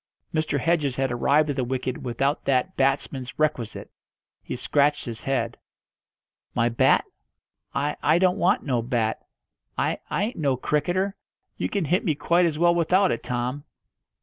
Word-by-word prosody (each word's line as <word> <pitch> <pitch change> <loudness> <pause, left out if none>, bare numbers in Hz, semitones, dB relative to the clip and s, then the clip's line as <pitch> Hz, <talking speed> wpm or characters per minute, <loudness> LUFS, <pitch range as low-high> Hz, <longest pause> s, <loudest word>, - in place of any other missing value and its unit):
Mr. 155 -2 0
Hedges 150 -3 +1
had 135 -1 0
arrived 145 +5 +2
at - - -4
the 130 - 0
wicket 130 0 -3
without 135 +4 -1
that 135 +7 +1
batsman's 135 -1 -1
requisite. 140 -7 -1 0.5
He - - -5
scratched 145 +3 +1
his 115 -2 -7
head. 120 -4 -1 1.0
"My 120 0 +2
bat? 115 - +3 0.7
I 145 +2 0
I 155 +3 +4
don't 185 +1 +2
want 195 +7 +2
no 125 -5 0
bat. 115 -2 -1 0.5
I - - 0
I 200 - 0
ain't 225 +4 -3
no 140 -5 +1
cricketer. 180 +9 0 0.4
You - - -2
can 200 -5 -1
hit 180 +6 +1
me 160 -7 +1
quite 170 +4 +3
as 155 -2 -2
well 170 +1 +4
without 180 +3 +3
it, - - -2
Tom." 125 +3 -3
145 Hz, 160 wpm, -25 LUFS, 125-170 Hz, 1.0 s, I